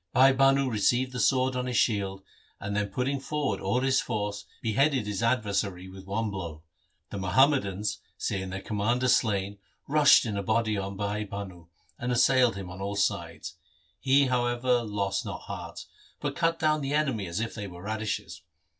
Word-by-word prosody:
Bhai 135 +1 +6
Bhanu 135 0 +4
received 125 +3 +1
the 125 - -5
sword 130 +1 +2
on 125 0 -2
his 125 -2 -1
shield, 100 -4 0 0.4
and 100 +1 -4
then 105 0 0
putting 130 +7 -2
forward 140 -7 -2
all 110 +7 0
his 135 0 +2
force, 105 -3 -3
beheaded 130 +2 +1
his 105 0 -3
adversary 100 -6 0
with 95 0 -12
one 105 +2 -1
blow. 85 -5 -6 0.5
The 100 - -4
MUhammadans, 100 - +2 0.2
see 95 - -2
ing 95 - -5
their 95 +1 -5
commander 115 +4 0
slain, 100 -5 +1 0.3
rushed 145 -3 +6
in 105 -3 -2
a - - 0
body 110 +2 +1
on 100 0 -4
Bhai 105 +1 -2
Bhanu, 95 -4 -8 0.3
and 125 +1 -2
assailed 125 -1 +4
him 95 -2 -7
on 95 +2 -8
all 100 +1 -3
sides. 85 -2 -2 0.4
He, 135 +1 +4
however, 120 -1 +1
lost 105 -3 -2
not - - -6
heart, - - -7 0.3
but - - -3
cut 165 0 +1
down 155 -1 +1
the 140 +1 -1
enemy 130 -10 0
as 85 +4 -3
if 115 0 -3
they 105 -2 -5
were 90 -1 -11
radishes. 110 -2 -4
110 Hz, 180 wpm, -28 LUFS, 100-130 Hz, 0.5 s, Bhai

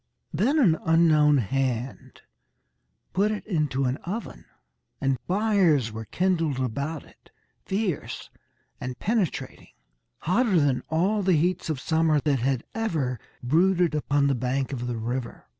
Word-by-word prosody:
Then 235 - +2
an 180 - +4
unknown 155 -3 +4
hand 130 +1 -2 0.9
put 200 +3 +2
it 215 -1 -4
into 150 -8 0
an 125 +2 0
oven, 205 +9 -6 0.5
and 135 -2 0
fires 185 - +2
were 110 +1 -6
kindled 165 - 0
about 140 +5 -3
it - - -22 0.4
fierce 190 -4 -3 0.5
and 125 0 -5
penetrating 210 -6 -2 0.5
hotter 190 +1 +2
than 140 -4 +2
all 185 +7 +1
the 190 -2 +3
heats 175 +2 0
of 155 -4 -1
summer 160 +1 +2
that 140 -3 +1
had 130 +1 0
ever 155 - -1 0.2
brooded 175 +5 +3
upon 145 -1 +1
the 140 - +3
bank 130 +2 -1
of 125 -2 -4
the 120 -1 -3
river. 120 +2 -4
155 Hz, 135 wpm, -26 LUFS, 130-185 Hz, 0.9 s, an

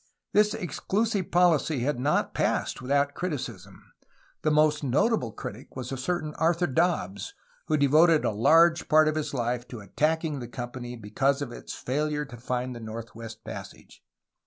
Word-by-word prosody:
This 210 +1 +4
ex 175 -9 -5
clusive 210 -2 0
policy 165 -5 +3
had 135 0 0
not 145 +4 +1
passed - - 0
without 140 +2 +1
criticism. 160 -6 -6 0.5
The 155 - +1
most 150 0 +3
notable 140 - +1
critic 120 +1 -9
was 130 0 -5
a - - -2
certain 155 +3 -2
Arthur 170 +2 +2
Dobbs, 130 - -1 0.3
who 155 - +2
devoted 155 +3 +5
a - - +2
large 165 +10 +4
part 155 0 +6
of 155 - +2
his 155 -1 -2
life 120 -2 -2
to 120 - -8
attacking 155 - -1
the 120 - -6
company 120 +1 -6
because 135 +6 0
of 125 - -7
its - - -8
failure 150 +3 -1
to 125 -3 -11
find 125 +1 -3
the - - -7
Northwest 115 0 -8
Passage. - - -10
145 Hz, 160 wpm, -27 LUFS, 120-160 Hz, 0.5 s, part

